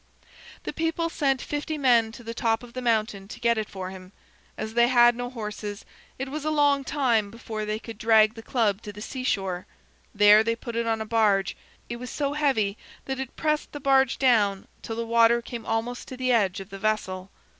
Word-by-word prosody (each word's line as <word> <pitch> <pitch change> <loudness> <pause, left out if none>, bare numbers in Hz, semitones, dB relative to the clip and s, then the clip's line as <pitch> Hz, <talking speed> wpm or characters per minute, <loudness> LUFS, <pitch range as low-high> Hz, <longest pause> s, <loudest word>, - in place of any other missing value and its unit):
The - - -4
people 330 +1 -1
sent 275 -5 0
fifty 295 +1 -3
men 240 -5 +3
to 240 - -11
the 230 0 -5
top 225 0 0
of 240 -1 -12
the 255 - -4
mountain 215 -4 0
to 220 - -9
get 235 -1 +2
it 215 - -4
for 185 -1 -6
him. 185 0 -12 0.4
As 220 - -5
they 235 0 +4
had 240 -1 +6
no 245 0 -4
horses, 210 -3 -6 0.3
it 270 - -4
was 300 +1 -5
a 310 - 0
long 290 -2 +3
time 245 -8 +1
before 220 -1 -6
they 215 0 -2
could 225 -1 -10
drag 220 -1 +5
the 225 - -10
club 220 -4 0
to 210 - -7
the 205 - -11
seashore. 195 -7 -2 0.5
There 210 +1 +7
they 230 +1 0
put 230 0 -7
it 230 0 -1
on 225 -1 0
a - - -3
barge. 210 -4 +2 0.3
It 235 - -5
was 250 +1 -7
so 285 -1 -2
heavy 260 -9 +1 0.3
that 265 0 -3
it 265 -1 -6
pressed 305 -1 -1
the 290 - -5
barge 270 -1 +3
down 210 -7 +2
till 225 - -5
the 230 0 -3
water 230 +1 +4
came 235 -1 -8
almost 230 +2 -2
to 255 - -8
the 255 0 0
edge 205 -4 +2
of 195 +1 -10
the 195 - -7
vessel. 195 -3 -2
230 Hz, 215 wpm, -26 LUFS, 215-255 Hz, 0.5 s, There